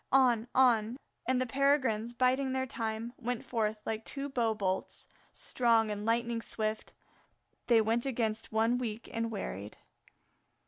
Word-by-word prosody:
On, 245 -4 +4
on; 240 -2 +4 0.3
and 255 0 +2
the 255 - +1
Peregrines, 255 -4 +1
biding 260 +2 +2
their 260 0 0
time, 225 -1 -4
went 245 -1 -3
forth 220 -2 0
like 220 0 -2
two 280 +3 -5
bow 235 -4 +1
bolts; 190 -2 -2 0.2
strong 230 -3 +2
and 205 0 -4
lightning 235 0 +1
swift 215 -1 -3 0.7
they 230 -2 +6
went 230 +4 +1
against 225 -4 -1
one 225 +3 +2
weak 230 -2 -4
and 230 0 -1
wearied. 105 - -5
230 Hz, 140 wpm, -32 LUFS, 220-255 Hz, 0.7 s, they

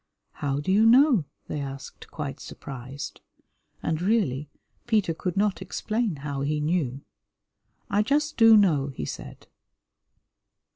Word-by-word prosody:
"How 140 -1 -2
do 145 +6 -1
you 205 +3 +5
know?" 250 - +6 0.2
they 150 - -3
asked, 135 -1 -8
quite 145 -4 -5
surprised, 135 +1 -8 0.6
and, 160 0 -1
really, 175 - +1 0.4
Peter 210 -7 +2
could 180 +3 -4
not 200 -3 +1
explain 220 -4 -2
how 140 -2 -3
he 150 +2 0
knew. 150 -4 -1 0.9
"I 205 -2 +2
just 295 +6 +1
do 225 -1 +8
know," 160 -9 +3
he 135 - -5
said. - - -8
165 Hz, 130 wpm, -26 LUFS, 140-215 Hz, 0.9 s, do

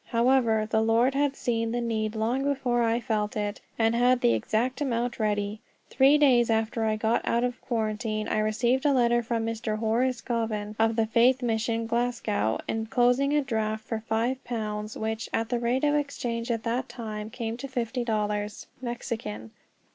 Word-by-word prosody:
However, 235 -2 +3
the 220 0 +1
Lord 230 +4 +3
had 285 0 +1
seen 230 -3 -1
the 240 - 0
need 220 -2 -2
long 235 +5 0
before 260 -4 0
I 230 0 +2
felt 215 -3 -2
it, 205 0 -3 0.2
and 225 0 +3
had 245 +1 +3
the 115 - +4
exact 225 - -1
amount 240 -3 -1
ready. 210 -1 -1 0.3
Three 270 +3 +5
days 250 -5 +4
after 225 0 0
I 215 0 +1
got 220 +2 +1
out 235 +1 +1
of 250 0 -2
quarantine 215 -2 -2
I - - 0
received 235 +4 +1
a 290 -2 +3
letter 240 -2 +3
from 230 -1 -2
Mr. 225 -1 -2
Horace 235 +3 +1
Goven, 220 -3 -2
of 225 0 +3
the 225 -1 +2
Faith 245 +3 +3
Mission, 230 0 0
Glasgow, 230 - 0
enclosing 245 +5 +2
a 295 - +4
draft 220 -3 -2
for 225 - -3
five 230 +4 -1
pounds 215 -2 -4
which, 220 0 -3
at 225 0 0
the 240 -1 0
rate 245 +3 0
of 290 0 +3
exchange 250 -5 -2
at 230 -2 -1
that 240 +2 -2
time, 215 -2 -6
came 225 0 -4
to 275 - -6
fifty 245 -1 -2
dollars 210 -2 -2 0.2
Mexican. 230 - -5
230 Hz, 175 wpm, -27 LUFS, 220-245 Hz, 0.3 s, Three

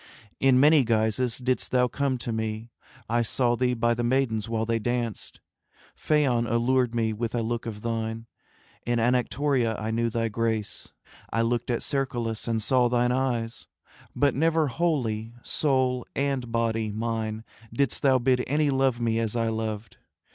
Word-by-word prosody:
In 130 -1 +4
many 150 +1 +6
guises 115 +1 +1
didst 130 0 -1
thou 125 -1 +3
come 135 0 -1
to 120 - -5
me; 110 +1 -3 0.4
I 120 +2 +1
saw 120 +1 +1
thee 125 0 +1
by 120 0 +2
the 120 +1 -2
maidens 120 -3 0
while 110 -1 -1
they 115 0 0
danced, 120 -1 -3 0.5
Phaon 130 -6 +1
allured 120 +1 +1
me 110 -1 +1
with 115 +2 -3
a 115 - 0
look 115 +1 -3
of 105 -2 -7
thine, 115 0 -3 0.6
In 120 0 0
Anactoria 125 0 +1
I 110 +1 -3
knew 115 +1 0
thy 115 0 -1
grace, 110 -1 -2 0.4
I 115 +1 +1
looked 120 +1 -1
at 120 - -1
Cercolas 120 -5 -2
and 115 -2 0
saw 125 +1 +3
thine 120 0 +2
eyes; 120 -3 -2 0.5
But 145 -3 +3
never 160 +1 +2
wholly, 120 -7 -1
soul 130 -4 0
and 135 -4 -1
body 115 -2 0
mine, 110 0 -3 0.3
Didst 130 +2 0
thou 135 -2 +4
bid 125 0 +2
any 145 +1 +2
love 135 -2 +1
me 115 -1 0
as 115 0 -2
I 115 -1 +1
loved. 110 -1 -4
120 Hz, 160 wpm, -26 LUFS, 115-130 Hz, 0.6 s, many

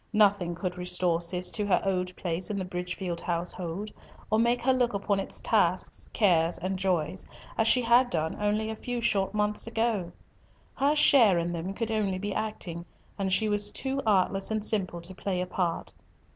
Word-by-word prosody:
Nothing 200 -5 +3
could 180 0 -4
restore 180 -1 0
Cis 180 +1 0
to 210 -2 -2
her 185 -3 +4
old 180 -1 -1
place 175 0 -3
in 210 - -2
the 190 - -2
Bridgefield 180 -1 -4
household, 175 +3 -3 0.4
or 215 - +3
make 235 +1 +2
her 260 +1 +4
look 245 -4 +1
upon 200 0 0
its 195 - -4
tasks, 185 -5 0
cares, 175 -5 +3
and 185 +2 -3
joys 185 -1 -1 0.3
as 225 - +2
she 250 +2 +4
had 240 +2 +5
done 160 -4 -1
only 210 +1 0
a - - -4
few 245 +2 -4
short 205 -4 0
months 210 +1 +1
ago. 225 -6 -1 0.6
Her 285 +2 +2
share 240 - +6
in 170 0 -1
them 175 +3 -4
could 225 0 -2
only 205 -4 0
be 205 +1 -3
acting, 190 -6 -4 0.4
and 190 -1 -1
she 215 +4 +3
was 205 0 +2
too 270 0 -3
artless 195 -2 +1
and 215 -1 -1
simple 185 -6 -1
to 175 +3 -7
play 185 -1 -3
a 180 - -1
part. 180 -2 -2
195 Hz, 185 wpm, -28 LUFS, 180-220 Hz, 0.6 s, share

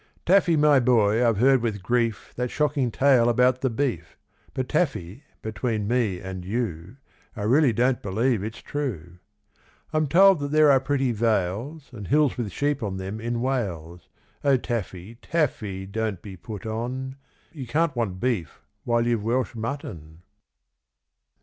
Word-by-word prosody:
Taffy, 180 -3 +4
my 150 -2 +5
boy, 115 -2 +3
I've 115 -3 +2
heard 130 +3 +4
with 105 -5 -3
grief 115 -2 -1
That 125 0 -2
shocking 145 -3 0
tale 125 -1 +4
about 125 +2 +3
the 130 - +1
beef; 115 - -3 0.4
But 130 -2 -2
Taffy, 135 - -2 0.2
between 110 0 -2
me 110 -6 0
and 95 0 -7
you, 100 -1 -4 0.4
I 105 - -5
really 130 +5 +4
don't 125 +2 +1
believe 110 +3 0
it's 110 +1 -7
true. 90 - -5 0.7
I'm 155 -1 +1
told 190 +3 +6
that 145 0 -3
there 155 0 +5
are 135 - +5
pretty 135 -1 0
vales 115 - -1
And 105 -5 -8
hills 150 -1 +3
with 115 -5 -4
sheep 145 +5 -1
on 100 -3 -3
them 95 +3 -5
in 120 0 -2
Wales; 90 -10 -3 0.3
O 140 -2 +4
Taffy, 115 -3 -5
Taffy, 105 - -2
don't 105 -2 -3
be 100 -2 -8
put 100 +2 -9
on, 125 +4 -4 0.4
You 140 -6 -8
can't 150 +3 0
want 100 -6 -2
beef 110 - -2 0.2
while 120 0 +1
you've 120 -3 0
Welsh 125 +4 0
mutton. 90 - -6
120 Hz, 155 wpm, -25 LUFS, 100-135 Hz, 0.7 s, told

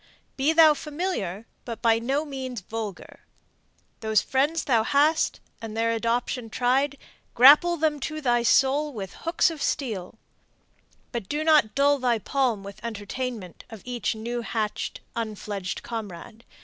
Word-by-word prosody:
Be 275 +3 +2
thou 320 -1 +7
familiar, 290 - -4 0.2
but 230 -2 -6
by 225 -1 +4
no 270 +6 -1
means 260 -5 -5
vulgar. 215 -1 -7 0.8
Those 220 -1 +2
friends 285 +8 0
thou 235 -5 +3
hast, 295 +7 +2 0.2
and 225 -1 -6
their 230 0 +2
adoption 230 +1 -1
tried, 265 +5 +1 0.4
Grapple 295 +8 +7
them 305 -2 0
to 305 +4 -4
thy 240 -5 +2
soul 275 +5 +3
with 195 -5 -6
hooks 335 +1 +1
of 315 -3 -8
steel; 220 -8 -2 0.9
But 235 -6 -5
do 300 +1 -1
not 305 -9 +4
dull 285 +1 +3
thy 245 -2 +2
palm 235 -2 -1
with 200 +2 -11
entertainment 220 -2 -5
Of 220 -4 -11
each 245 -2 -2
new 235 +2 -4
hatch'd, 220 -2 -3
unfledged 210 -4 -4
comrade. 220 -1 -7
240 Hz, 140 wpm, -25 LUFS, 220-285 Hz, 0.9 s, thou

